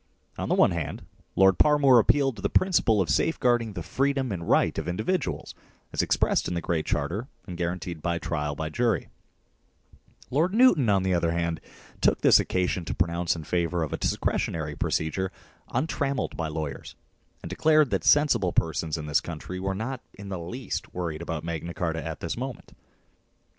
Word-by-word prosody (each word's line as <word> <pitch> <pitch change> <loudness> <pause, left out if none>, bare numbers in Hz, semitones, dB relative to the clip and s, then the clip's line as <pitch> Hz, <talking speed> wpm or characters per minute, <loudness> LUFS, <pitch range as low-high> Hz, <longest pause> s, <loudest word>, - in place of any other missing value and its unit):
On - - -4
the - - +3
one - - +5
hand, - - -4 0.3
Lord 95 -1 +5
Parmoor 145 -4 +6
appealed 135 +3 +2
to - - -8
the - - 0
principle 155 - +3
of 85 - -1
safeguard 125 -7 +2
ing 110 -2 -6
the 90 -4 -5
freedom 135 - 0
and 85 -3 -4
right - - +3
of - - -5
individuals 110 - -2 0.4
as - - +1
expressed - - +1
in 90 - -2
the - - 0
Great 85 -2 -2
Charter 85 - -1 0.2
and 90 - -7
guaranteed 85 -1 -3
by 85 +1 -1
trial 75 -2 -2
by 80 +2 -3
jury 120 +3 0 1.2
Lord 165 +9 +1
Newton, 205 - +5
on 100 -2 +3
the 95 -1 +1
other 85 -1 +1
hand, 85 -1 -1 0.4
took - - +3
this - - +7
occasion 90 -1 0
to 75 -1 -3
pronounce 85 0 0
in 80 - -6
favour 85 +1 0
of 75 - -4
a - - -1
discretionary 75 -2 -1
procedure 95 +7 -1 0.4
untrammelled 140 -4 -1
by 80 - -2
lawyers, 75 -2 -5 0.5
and - - -6
declared 155 -3 +3
that - - 0
sensible 120 -11 +4
persons 80 0 0
in 75 - -5
this 75 -1 +2
country 85 +2 -6
were 95 +1 -2
not 125 +5 -4
in 100 0 -9
the 95 -2 -4
least 120 +10 -5
worried 85 -3 -3
about 80 -2 -4
Magna 85 0 -4
Carta 80 -1 -2
at 80 0 -6
this 85 - -3
moment. 130 -1 -6
90 Hz, 180 wpm, -26 LUFS, 80-125 Hz, 1.2 s, this